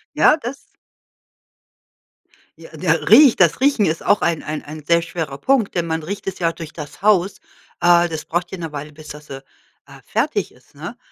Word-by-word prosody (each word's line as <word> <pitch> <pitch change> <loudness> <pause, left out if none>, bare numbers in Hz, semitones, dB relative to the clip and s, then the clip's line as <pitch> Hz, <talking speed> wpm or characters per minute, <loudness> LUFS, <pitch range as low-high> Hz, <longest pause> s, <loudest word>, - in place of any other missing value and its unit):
Ja, 305 - +5
das 275 -1 -8 1.9
Ja - - -13
ja - - +1
riecht. 285 -5 +6
Das 170 +3 +4
Riechen 265 -7 +3
ist 160 +1 -2
auch 205 - +3
ein 165 -2 0
ein 155 0 -5
ein 155 0 -9
sehr 170 +2 +3
schwerer 160 -4 -5
Punkt, 260 - +1
denn 170 -1 0
man 160 0 -2
riecht 200 +5 -6
es 190 -1 -5
ja 165 - +2
auch - - -6
durch 165 -2 -9
das 150 +2 -10
Haus. 200 -2 +3 0.4
Äh, 175 0 +5
das 160 -2 -5
braucht 175 +1 -3
ja 190 - -7
'ne 165 -3 -6
Weile, 150 +1 -7
bis 155 +1 -14
das, 150 0 -11
äh, 135 0 -8 0.4
äh, - - -15
fertig - - -1
ist, - - -25
ne? - - -8
170 Hz, 200 wpm, -20 LUFS, 155-200 Hz, 1.9 s, riecht